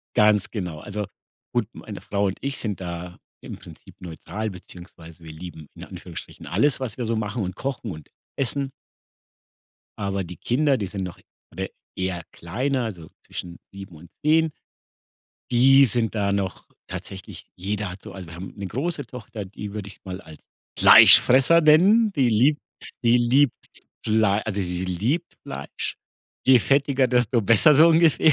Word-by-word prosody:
Ganz 105 -1 +3
genau. 90 -8 -5
Also, 105 +4 -5 0.5
gut, 120 -4 0
meine 105 -2 -9
Frau 100 0 -1
und 95 - -3
ich 140 0 -2
sind 105 -4 -3
da 90 0 -6 0.2
im - - -8
Prinzip - - -15
neutral 90 +5 -5
beziehungsweise 85 -2 -13
wir 80 - -9
lieben 80 -1 -10
in - - -11
Anführungsstrichen - - -10
alles, 125 +10 +1
was 125 -5 -4
wir 125 - -3
so 115 +1 -1
machen 110 0 -2
und 90 0 -5
kochen 130 -4 -4
und 80 -3 -10 0.3
essen. 135 +1 -1 1.3
Aber 100 -1 -2
die 90 -1 -9
Kinder, 135 - +1
die 100 - -3
sind 95 0 -5
noch 90 -2 -7 0.3
oder - - -4 0.3
eher 95 -2 -2
kleiner, 125 +9 -2
also, 85 -8 -7 0.2
zwischen 85 -1 -7 0.2
7 95 -3 -10
und 85 +3 -14 0.2
10. 160 +1 +4 1.0
Die 135 +3 +6
sind 115 0 -1
da 100 -2 0
noch 100 -2 -3 0.2
tatsächlich 95 -2 -9
jeder 100 +2 -3
hat 95 +1 -10
so - - -10
also, 95 -2 -9
wir 80 - -10
haben 90 +3 -9
'ne 100 -1 -5
große 145 - -3
Tochter, 115 -3 -8
die 100 +2 -8
würde 105 -1 -6
ich 100 - -13
mal 95 -1 -6
als 80 -5 -14 0.4
Fleischfresser 135 +7 +8
nennen. 195 +8 +5
Die 135 -4 +3
liebt 130 +7 +3 0.4
die 115 +1 +5
liebt 125 +3 +3 0.5
Flei 110 -2 +2
also, 105 -2 -2
sie 90 0 -3
liebt 110 - -2
Fleisch. 70 +1 -6 0.5
Je 130 -1 +7
fettiger, 135 +1 +2
desto 120 -1 +2
besser 115 +8 +5
so 160 +4 +7
ungefähr. 160 -1 +5
105 Hz, 165 wpm, -24 LUFS, 95-130 Hz, 1.3 s, Fleischfresser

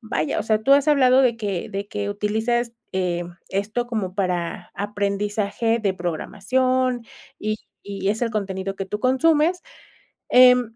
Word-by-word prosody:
vaya, 155 - -2
o - - -1
sea, 220 0 +1
tú 275 - +4
has 285 +1 +5
hablado 260 -3 +5
de 240 -3 +2
que 200 -6 -3
de 200 +1 -4
que 205 -1 -3
utilizas, 220 +3 -1 0.2
em, 175 -2 -2
esto 210 +5 -2
como 210 -6 -3
para 180 -3 -2
aprendizaje 205 +2 -1
de 195 -3 0
programación, 245 +8 0 0.3
y 215 0 -1 0.3
y 195 -1 -3
es 215 +4 0
el 230 - +1
contenido 195 -2 -3
que 195 -1 -4
tú 210 - -4
consumes. 310 - +2 0.7
Em, 250 -2 +6
210 Hz, 150 wpm, -23 LUFS, 195-245 Hz, 0.7 s, Em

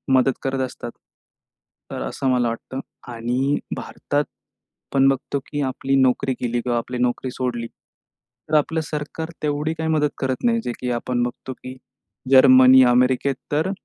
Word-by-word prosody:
मदत 130 +1 +4
करत 135 0 -1
असतात, 120 -1 -8 1.0
तर - - -4
असं 135 - -3
मला 125 -1 +2
वाटतं. 115 +3 -6 0.3
आणि 125 +4 0 0.2
भारतात - - -2 0.7
पण 135 0 +5
बघतो 135 +1 -1
की 145 - -3
आपली 135 +1 -1
नोकरी 130 +1 +2
गेली 120 0 -1
किंवा 120 0 -1
आपली 125 +2 -4
नोकरी 125 +1 -1
सोडली, 120 -2 -3
तर 155 - -10
आपलं 160 +2 0
सरकार 155 +2 -4
तेवढी 150 +1 0
काही 160 0 -3
मदत 150 -2 +2
करत 130 -1 -2
नाही. 230 -1 +3
जे - - -2
की 125 -1 -2
आपण 120 +1 -1
बघतो 120 +2 -5
की 130 0 -10 0.6
जर्मनी, 130 0 +8
अमेरिकेत 125 +2 +2 0.2
तर 155 +6 +1
130 Hz, 150 wpm, -22 LUFS, 125-145 Hz, 1.0 s, जर्मनी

